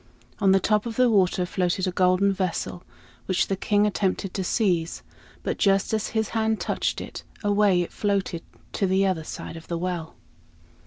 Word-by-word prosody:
On 195 Hz, -2 st, +4 dB
the 195 Hz, -, +5 dB
top 210 Hz, +3 st, +1 dB
of 225 Hz, -, -5 dB
the 250 Hz, -1 st, +4 dB
water 185 Hz, -3 st, +3 dB
floated 180 Hz, +1 st, 0 dB
a 185 Hz, -, 0 dB
golden 185 Hz, +2 st, +3 dB
vessel, 185 Hz, -1 st, -3 dB, 0.4 s
which 185 Hz, -1 st, +2 dB
the 195 Hz, -, +1 dB
King 205 Hz, +2 st, +2 dB
attempted 195 Hz, -2 st, -1 dB
to 190 Hz, -, -2 dB
seize; 180 Hz, -5 st, 0 dB, 0.4 s
but -, -, -2 dB
just 195 Hz, +1 st, +2 dB
as 215 Hz, -1 st, 0 dB
his 220 Hz, -1 st, -1 dB
hand 220 Hz, -1 st, 0 dB
touched -, -, -1 dB
it, -, -, -8 dB, 0.2 s
away 205 Hz, -3 st, +3 dB
it -, -, -9 dB
floated 195 Hz, -5 st, -1 dB, 0.3 s
to 195 Hz, -, +1 dB
the 190 Hz, +1 st, +3 dB
other 185 Hz, -4 st, 0 dB
side 160 Hz, -, -7 dB
of 165 Hz, -, -10 dB
the 170 Hz, -, -2 dB
well. 170 Hz, -2 st, -4 dB
195 Hz, 180 wpm, -25 LUFS, 180-205 Hz, 0.4 s, the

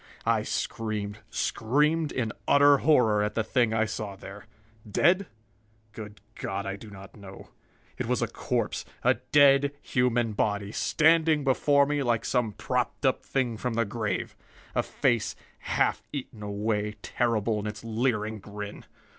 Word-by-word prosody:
I -, -, +2 dB
screamed, 105 Hz, -2 st, -3 dB
screamed 150 Hz, +6 st, +1 dB
in 115 Hz, -4 st, -2 dB, 0.2 s
utter 145 Hz, 0 st, +6 dB
horror 120 Hz, -9 st, +4 dB
at 105 Hz, 0 st, -1 dB
the 115 Hz, -, +1 dB
thing 120 Hz, 0 st, +1 dB
I 110 Hz, 0 st, +2 dB
saw 105 Hz, -2 st, -5 dB
there. 100 Hz, +1 st, -11 dB, 0.4 s
Dead? 180 Hz, -, +3 dB, 0.6 s
Good 105 Hz, -2 st, -10 dB
God, 100 Hz, +1 st, -4 dB
I 100 Hz, 0 st, -3 dB
do 105 Hz, +2 st, -11 dB
not 100 Hz, -1 st, -12 dB
know. 100 Hz, -3 st, -12 dB, 0.5 s
It -, -, -2 dB
was -, -, +1 dB
a -, -, 0 dB
corpse, -, -, -2 dB, 0.2 s
a -, -, +5 dB, 0.2 s
dead 140 Hz, -1 st, +5 dB
human 120 Hz, -4 st, +1 dB
body, 100 Hz, -1 st, -1 dB
standing 160 Hz, +2 st, +3 dB
before 140 Hz, +1 st, +3 dB
me 145 Hz, 0 st, -1 dB
like 120 Hz, -3 st, 0 dB
some 120 Hz, -4 st, 0 dB
propped 125 Hz, +4 st, -2 dB
up 130 Hz, -, +2 dB
thing 125 Hz, -4 st, -1 dB
from 120 Hz, +1 st, -3 dB
the 115 Hz, 0 st, +1 dB
grave. 105 Hz, -2 st, -3 dB, 0.4 s
A -, -, +2 dB
face 120 Hz, -6 st, 0 dB, 0.2 s
half -, -, 0 dB
eaten 130 Hz, -6 st, -6 dB
away, 105 Hz, +1 st, -2 dB
terrible 115 Hz, -2 st, 0 dB
in 105 Hz, -, -4 dB
its 105 Hz, +1 st, -6 dB
leering 110 Hz, -2 st, -1 dB
grin. 105 Hz, 0 st, -8 dB
115 Hz, 150 wpm, -27 LUFS, 105-135 Hz, 0.6 s, utter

